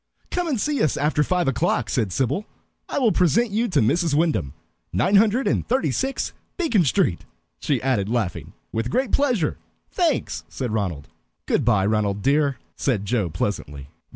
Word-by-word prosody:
"Come 355 -1 -1
and 275 -8 0
see 290 +1 0
us 155 - +1
after 150 +1 +1
five 180 0 0
o'clock," 120 -3 +1
said 105 -1 0
Sybil. 135 - -1 0.4
"I - - -2
will 245 -6 +3
present 205 +7 +2
you 225 +4 +1
to 185 - +2
Mrs. 160 +7 +2
Wyndham. 150 - 0 0.4
Nine 185 - +3
hundred 225 +5 +3
and - - +1
thirty 260 +3 +1
six, 270 +1 -2 0.2
Beacon 285 - +2
Street," 140 - +1 0.4
she 140 -4 0
added, 120 -7 +1
laughing. 110 -7 -2 0.2
"With 115 +2 -2
great 255 - 0
pleasure 245 - +1 0.3
thanks," 335 -7 0
said 125 -4 -4
Ronald. 90 -10 -2 0.4
"Good - - +1
by, 105 -5 +3
Ronald 105 -1 0
dear," 140 0 +2 0.2
said 110 -8 -1
Joe 105 -5 0
pleasantly. 75 -5 -4
140 Hz, 165 wpm, -23 LUFS, -, 0.4 s, will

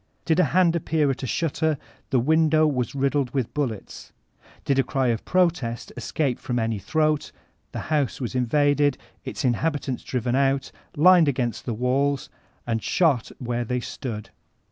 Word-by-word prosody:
Did 165 +1 +2
a 180 - +5
hand 170 +4 +3
appear 155 -3 +1
at 130 - -5
a 130 - -3
shutter, 160 +3 0 0.3
the 130 - +3
window 155 +3 +3
was 130 -5 -1
riddled 140 -1 +1
with 130 -4 -1
bullets. 125 -9 -4 0.5
Did 135 -1 +2
a - - +4
cry 135 -3 0
of 115 -2 -1
protest 165 -11 0
escape 140 -6 -1
from 125 - -3
any 115 -2 -1
throat, 155 +5 0 0.4
the - - -4
house 145 -5 0
was 125 -2 -4
invaded, 145 +2 +2 0.3
its - - -4
in 125 - +4
habitants 145 -1 -2
driven 125 -1 -2
out. 135 0 +1 0.3
lined 175 +1 +6
against 120 -5 -1
the 120 - -2
walls, 135 +4 0 0.3
and 115 -1 -1
shot 150 -10 +1
where 120 -1 -2
they 125 +2 -2
stood. 110 -2 -6
135 Hz, 165 wpm, -24 LUFS, 125-155 Hz, 0.5 s, lined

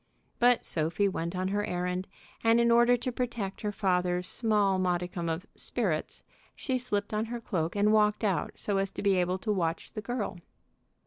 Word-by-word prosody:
But 245 0 +4
Sophie 165 +5 +1
went 170 -2 -3
on 185 +1 -1
her 205 +1 0
errand, 180 0 -2 0.4
and 225 +1 +5
in 235 0 +4
order 240 +1 +5
to 255 +1 -3
protect 235 -5 -3
her 210 - -1
father's 180 -2 0
small 205 -4 +2
modicum 175 -1 -1
of 165 +4 -3
"sperrits" - - -1 0.3
she 260 -2 -1
slipped 205 -4 -2
on 215 +1 0
her 240 +1 -5
cloak 170 -6 -2
and 210 +1 +3
walked 210 0 +3
out 195 -7 0
so 200 -2 -1
as 195 0 0
to - - -5
be 200 -2 +3
able 180 +1 +1
to 215 +3 -2
watch 170 -4 -1
the 215 - -5
girl. 225 -6 -3
200 Hz, 185 wpm, -29 LUFS, 180-225 Hz, 0.4 s, and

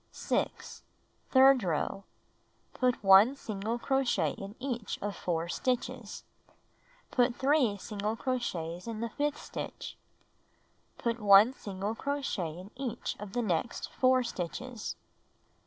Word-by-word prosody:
6. - - -2 0.5
Third 265 -1 +7
row: 185 +2 -2 0.7
Put 250 -3 0
1 195 +7 +7
single 220 -2 -3
crochet 240 - +1
in 195 +2 -8
each 245 -4 -3
of 205 0 -3
4 170 -1 -2
stitches. 250 +1 -2 0.9
Put 245 -1 +2
3 265 -6 +2
single 210 +1 -3
crochets 185 -9 -3
in 225 -1 -4
the 235 - -2
fifth 295 +3 -1
stitch. - - -7 1.0
Put 235 0 -1
1 205 +3 +7
single 200 -2 -4
crochet 230 - -3
in 185 +4 -10
each 255 -3 -4
of 205 -1 -8
the 245 - 0
next 185 +2 -2
4 255 0 +3
stitches. 235 +3 -5
225 Hz, 120 wpm, -30 LUFS, 195-255 Hz, 1.0 s, Third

